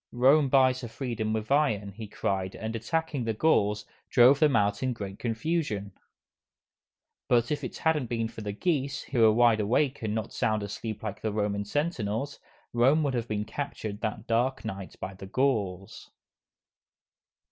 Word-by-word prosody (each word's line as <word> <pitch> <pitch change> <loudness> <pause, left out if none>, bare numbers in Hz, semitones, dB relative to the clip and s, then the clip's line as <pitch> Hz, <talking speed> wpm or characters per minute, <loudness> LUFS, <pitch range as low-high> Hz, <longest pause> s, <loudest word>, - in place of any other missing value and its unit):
"Rome 135 +4 +4
buys 130 -1 +4
her 120 - -5
freedom 115 -2 -3
with 110 +2 -3
iron!" 110 -9 +2
he 110 +2 -8
cried, 95 -2 -2
and 110 +1 -4
attacking 150 +4 -2
the 115 -1 -1
Gauls, 105 -7 +2 0.2
drove 130 +2 +6
them 150 -5 +4
out 105 -1 +2
in 130 -1 0
great 100 -2 -7
confusion. 115 - -2 1.4
But 120 +1 +3
if 145 -1 -1
it 125 - -5
hadn't 155 -6 +1
been 115 -1 -1
for 115 -1 -9
the 105 -1 -3
geese, 140 - -1
who 130 - -2
were 110 -1 +7
wide 115 0 +4
awake 130 +6 +1
and 110 -1 -2
not 110 - -3
sound 110 -1 0
asleep 110 +2 -5
like 105 -2 -5
the 110 - -1
Roman 105 -1 -1
sentinels, 140 - -2 0.3
Rome 135 +6 +4
would 140 -2 0
have 120 -2 -2
been 105 -1 -2
captured 110 -7 -5
that 110 0 -3
dark 120 +3 0
night 95 -3 -6
by 95 - -5
the 95 0 -10
Gauls. 100 -6 -1
115 Hz, 170 wpm, -28 LUFS, 105-135 Hz, 1.4 s, were